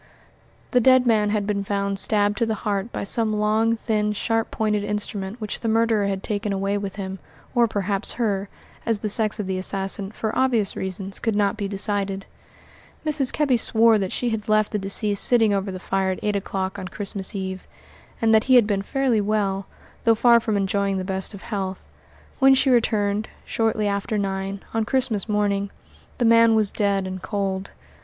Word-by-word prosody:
The 250 - +3
dead 255 +1 +5
man 215 -3 +3
had 205 -1 0
been 200 -1 -1
found 200 0 -2
stabbed 205 0 +2
to 230 - +1
the 220 - -1
heart 205 +2 -1
by - - -4
some 215 +1 +3
long, 215 +2 +2
thin, 210 -2 -1
sharp 225 +2 -1
pointed 210 -2 -1
instrument 210 0 -3
which 215 -2 -5
the 230 - -4
murderer 225 -2 +2
had 195 -1 -3
taken 205 -1 -2
away 195 +1 -1
with 200 -1 -5
him 190 -1 -6 0.3
or 240 -2 +4
perhaps 200 -2 -2
her, 205 -4 -1 0.3
as 225 -3 -1
the 215 - -2
sex 215 +1 +3
of 210 - -2
the 185 0 -2
assassin, 195 +1 0
for 220 0 -4
obvious 240 -6 +1
reasons, 190 +1 -5
could 225 -2 -1
not 205 0 +1
be 205 -2 -3
decided. 195 -1 0 0.8
Mrs. 295 -4 +2
Kebby 285 -5 +2
swore 225 -1 +3
that 190 -2 -2
she 245 -1 -1
had 220 0 -4
left 215 0 +2
the 210 - -1
deceased 200 +1 0
sitting 225 -4 +4
over 195 0 -1
the 185 - -5
fire 190 +1 -1
at 185 - -2
eight 210 -1 0
o'clock 190 -1 -3
on 185 - -6
Christmas 200 +2 -5
Eve, 190 -1 -5 0.5
and 225 -1 +3
that 220 0 +4
he 260 - +5
had 235 -4 +6
then 200 -2 0
been - - -2
fairly 250 0 0
well, 200 -2 -1 0.4
though 230 -1 +4
far 235 +1 +5
from 220 -2 -1
enjoying 200 0 0
the 185 - -3
best 190 +2 -3
of 195 - -12
health. 190 -3 -4 0.5
When 270 0 +6
she 265 0 +2
returned, 215 -3 +1 0.2
shortly 220 -2 0
after 200 +2 -1
nine, 195 0 -3
on 225 -1 +1
Christmas 235 -3 0
morning, 200 -1 0 0.5
the 245 - +1
man 230 0 +5
was 215 -2 +2
dead 200 -2 0
and 185 0 -6
cold. 195 -1 -3
205 Hz, 195 wpm, -23 LUFS, 195-225 Hz, 0.8 s, had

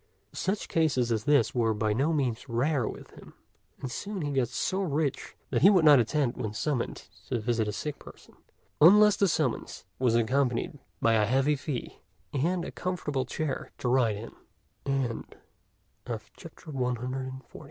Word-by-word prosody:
Such 195 +2 -2
cases 140 -7 +1
as 110 -1 -1
this 145 -6 +3
were 115 -3 +1
by 105 0 0
no 140 +8 +1
means 130 -5 -1
rare 125 +1 +1
with - - -8
him; - - -15 0.4
and 130 - -5
soon 200 +6 -4
he 145 - -2
got 135 -3 +1
so 185 +10 -1
rich 150 -5 -2 0.2
that - - +1
he 190 - +8
would 185 -6 +4
not 145 -3 +8
attend 125 +2 0
when 105 -1 -4
summoned 125 +2 -2 0.2
to 120 - -1
visit 115 -1 0
a - - -1
sick 150 +8 -5
person, - - -15 0.5
unless 210 +5 +8
the 200 - +3
summons 150 - -2
was 125 -3 +2
accompanied 125 +3 0 0.2
by 115 - +4
a 105 -2 +3
heavy 135 +5 +2
fee 140 -2 -5 0.3
and 170 +5 0
a - - -6
comfortable 150 -7 -2
chair 150 +2 -3
t - - -3
135 Hz, 145 wpm, -28 LUFS, 120-155 Hz, 0.5 s, he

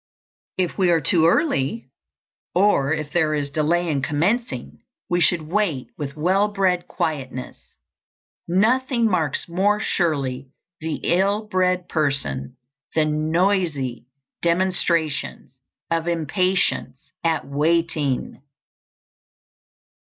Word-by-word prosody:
If 185 +1 -1
we 185 -2 +4
are 170 -1 +4
too 160 +2 +3
early, 225 - +1 0.7
or 180 -8 +3
if 155 -2 -2
there 155 -3 +2
is 145 -1 -2
delay 165 +4 +1
in 145 -4 0
commencing, 190 - -1 0.3
we 175 0 +1
should 165 0 +3
wait 165 -5 -1
with 145 -1 -6
well 190 +6 +2
bred 185 -4 0
quietness. 135 -7 -4 0.9
Nothing 235 +6 +2
marks 165 -9 0
more 195 +5 +1
surely 140 -9 -1 0.3
the 160 -1 -3
ill 195 +5 +2
bred 185 -2 +1
person 135 - -1 0.4
than 155 0 +1
noisy 160 - 0 0.3
demonstrations 170 -5 0 0.4
of 165 0 0
impatience 165 -4 0
at 165 -2 0
waiting. 150 -2 0
165 Hz, 100 wpm, -22 LUFS, 145-185 Hz, 0.9 s, we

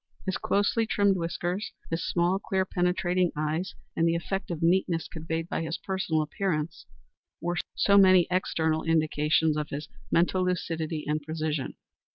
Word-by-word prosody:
His 190 - -1
closely 205 +3 +1
trimmed 200 -3 +3
whiskers, 175 +3 -3 0.2
his 165 0 -1
small, 175 +2 +1
clear, 190 -1 0
penetrating 180 -1 +1
eyes, 155 +6 -2 0.2
and 165 - +2
the 165 - +2
effect 190 +4 -3
of 165 -2 -3
neatness 170 -1 +2
conveyed 165 0 -4
by - - -2
his 165 +1 -3
personal 180 -5 -1
appearance 155 -1 -3 0.5
were 175 +1 -2 0.2
so 200 0 +5
many 185 -2 +7
external 160 -4 +1
indications 155 -1 +2
of 150 -1 -2
his 145 +1 -5 0.2
mental 180 +2 +2
lucidity 165 -3 -2
and 150 +1 0
precision. 155 -2 -3
170 Hz, 150 wpm, -28 LUFS, 160-185 Hz, 0.5 s, many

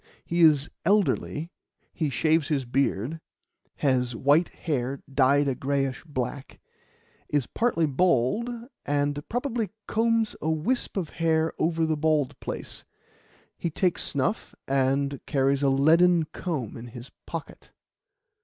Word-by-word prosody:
He 170 +1 0
is 150 -3 +5 0.2
elderly, 180 -4 +1 0.4
he 155 -3 -1
shaves 155 +2 +2
his 140 -4 0
beard, 135 +3 -1 0.5
has 125 -4 +1
white 145 +8 +3
hair 135 -4 -3
dyed 140 +1 +3
a 135 - +1
greyish 135 0 -1
black, 135 -2 -5 0.7
is 145 -4 +1
partly 225 - +1
bald, 155 - +2 0.3
and 145 0 0
probably 240 -3 -1 0.2
combs 225 0 +1
a 155 - -1
wisp 170 +11 -1
of 175 -5 -2
hair 160 -1 +1
over 165 0 +1
the 160 -1 0
bald 150 -3 +1
place; - - -6 0.8
he 170 - -1
takes 175 +2 0
snuff, 145 +10 -2
and 135 +1 +1
carries 135 0 +2
a 140 - +3
leaden 165 +5 +5
comb 145 - -4
in 120 +1 -8
his 120 +2 -10 0.2
pocket." 165 -3 -7
150 Hz, 125 wpm, -26 LUFS, 135-165 Hz, 0.8 s, is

